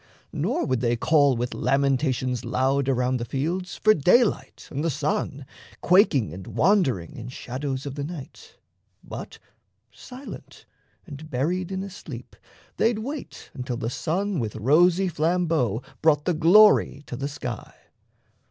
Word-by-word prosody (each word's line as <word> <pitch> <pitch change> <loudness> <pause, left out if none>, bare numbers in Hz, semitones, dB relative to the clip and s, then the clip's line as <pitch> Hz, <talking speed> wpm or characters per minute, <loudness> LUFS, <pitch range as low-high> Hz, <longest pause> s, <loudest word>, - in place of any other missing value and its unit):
Nor - - -1
would 130 -2 0
they 120 -1 +1
call 145 0 +3
with 120 +1 -2
lamentations 130 -1 0
loud 135 +1 0
Around 125 0 +1
the 120 - -4
fields 170 +10 -3
for 215 - +4
daylight 215 - +2
and 145 +2 -3
the 165 - +1
sun, 145 -1 -2 0.4
Quaking 165 - +4
and 95 +1 -9
wand'ring 150 - +1
in 120 0 -7
shadows 130 +2 -5
of 140 - -5
the 140 0 -4
night; 175 - -9 0.5
But, - - -8 0.5
silent 260 +2 -11 0.4
and 155 -2 -10
buried 170 +8 -1
in 190 0 -3
a 200 - -6
sleep, 205 - -10 0.4
they'd 225 -1 +2
wait 270 +6 -7
Until 125 -2 -4
the 115 -1 -3
sun 190 +6 -1
with 110 -3 -3
rosy 170 - +3
flambeau 160 - 0 0.2
brought 150 -2 +3
The 180 - +2
glory 170 -2 +5
to - - -6
the 135 +3 -3
sky. 125 -5 -6
145 Hz, 145 wpm, -25 LUFS, 130-180 Hz, 0.5 s, glory